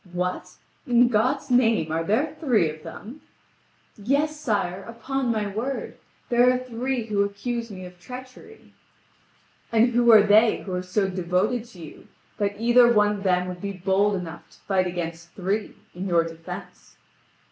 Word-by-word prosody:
"What? 180 +1 -3 0.3
In 245 0 +5
God's 255 +5 0
name, 225 -10 +3
are 165 +1 0
there 245 - 0
three 240 - +2
of 155 0 -12
them?" 240 - -10 0.8
"Yes, 280 +8 0
sire, 200 -9 -1
upon 245 +3 -3
my 215 -2 -1
word. 225 +7 -4 0.3
There 245 +1 +5
are 255 - +1
three 255 0 -3
who 210 -2 0
accuse 230 +4 -4
me 185 -3 -8
of 180 0 -13
treachery." 255 - -12 1.0
"And 230 +1 +4
who 240 0 +4
are 215 -2 +8
they 215 +2 +4
who 190 - -6
are 180 - -1
so 190 +2 0
devoted 190 +6 -1
to 230 -7 -16
you - - -14 0.3
that 205 0 -1
either 240 +1 +5
one 210 -2 +3
of - - -9
them 180 -1 +1
would 180 -1 -7
be 200 0 -4
bold 195 +2 +1
enough 170 -3 -7
to - - -21
fight 185 -2 0
against 170 -1 -6
three 200 +3 -2 0.2
in 185 +3 -5
your 170 -2 +3
defence?" 165 0 -10
210 Hz, 165 wpm, -24 LUFS, 180-240 Hz, 1.0 s, are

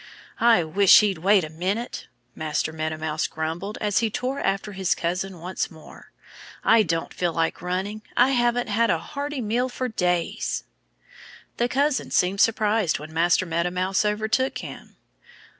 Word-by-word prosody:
"I 230 -6 +5
wish 190 +6 +6
he'd 200 -5 0
wait 195 +2 +4
a 155 - -5
minute," 190 +9 -3 0.3
Master 155 0 -2
Meadow 155 0 -3
Mouse 155 0 -2
grumbled 165 +6 -4
as 210 -2 +2
he 225 -1 +1
tore 250 +5 -3
after 195 +2 -1
his 190 -2 0
cousin 180 +1 -3
once 180 +3 -3
more. 160 -3 -15 0.5
"I 225 0 +5
don't 165 -4 -2
feel 175 -1 -1
like 165 0 -1
running. 190 +4 -3 0.2
I 245 +2 +5
haven't 240 -2 +2
had 230 +1 +1
a - - +3
hearty 285 - -5
meal 240 +4 0
for 255 +1 -3
days." 175 - -1 0.9
The 240 +1 +1
cousin 280 +2 0
seemed 190 +2 +2
surprised 215 -4 +2
when 155 +1 -10
Master 170 +2 +2
Meadow 170 +1 -1
Mouse 185 +2 0
overtook 220 +5 0
him. - - -9
195 Hz, 160 wpm, -24 LUFS, 170-225 Hz, 0.9 s, wish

